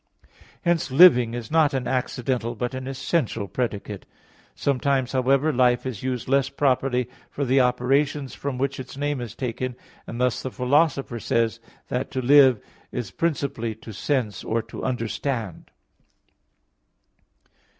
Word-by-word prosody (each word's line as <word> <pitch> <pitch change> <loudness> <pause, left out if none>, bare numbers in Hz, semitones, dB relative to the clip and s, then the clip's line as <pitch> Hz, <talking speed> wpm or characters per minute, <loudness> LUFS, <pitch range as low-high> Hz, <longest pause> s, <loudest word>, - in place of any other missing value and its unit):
Hence 170 -4 +1
"living" 125 -6 +6
is 120 0 -6
not 155 -3 +3
an 130 -2 -2
accidental 125 -2 -1
but 125 +2 -3
an 130 0 -5
essential 135 -5 -1
predicate. 105 -4 -4 0.5
Sometimes, 135 -1 0
however, 135 +4 +2
life 125 -1 +3
is 125 -6 -4
used 130 -2 -3
less 135 +1 +2
properly 130 -3 +1 0.2
for 140 - -3
the 130 +1 +4
operations 135 +3 +1
from 140 -2 -4
which 135 +1 -1
its 130 +1 -8
name 145 -2 -1
is 120 -2 -7
taken, 125 0 -3 0.3
and 115 - -6
thus 125 -1 +1
the 130 - -4
Philosopher 135 -1 +1
says 115 +1 0
(Ethic. 115 - -30
ix, - - -28
9) 125 - +1
that - - -5
to 130 - -1
live 135 -3 +6 0.3
is 120 -6 -4
principally 140 - -2
to 110 0 -11
sense 115 -2 -1
or 115 0 -1
to - - -9
understand. 115 - -3
130 Hz, 150 wpm, -24 LUFS, 120-140 Hz, 0.5 s, living